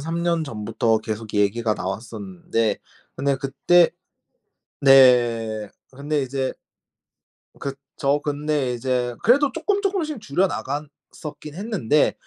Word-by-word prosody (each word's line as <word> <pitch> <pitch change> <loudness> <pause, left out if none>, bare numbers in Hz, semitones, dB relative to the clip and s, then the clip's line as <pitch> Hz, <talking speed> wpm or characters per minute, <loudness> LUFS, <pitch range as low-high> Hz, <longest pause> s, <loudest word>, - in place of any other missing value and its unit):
3 165 +3 -3
년 170 -1 +1
전부터 110 -2 0
계속 110 0 -6
얘기가 105 +2 +1
나왔었는데 115 - -3 0.4
근데 140 0 +1
그때 145 +6 +3 0.9
네. 120 -5 +5 0.2
근데 145 +2 -2
이제 130 0 -2 1.1
그쵸? 140 +1 -2
근데 145 -3 -1
이제 125 0 -1
그래도 275 +5 +4
쪼끔 405 -1 0
쪼끔씩 345 - -1
줄여나갔었긴 150 -3 -4
했는데 185 - +1
140 Hz, 225 characters per minute, -23 LUFS, 115-165 Hz, 1.1 s, 네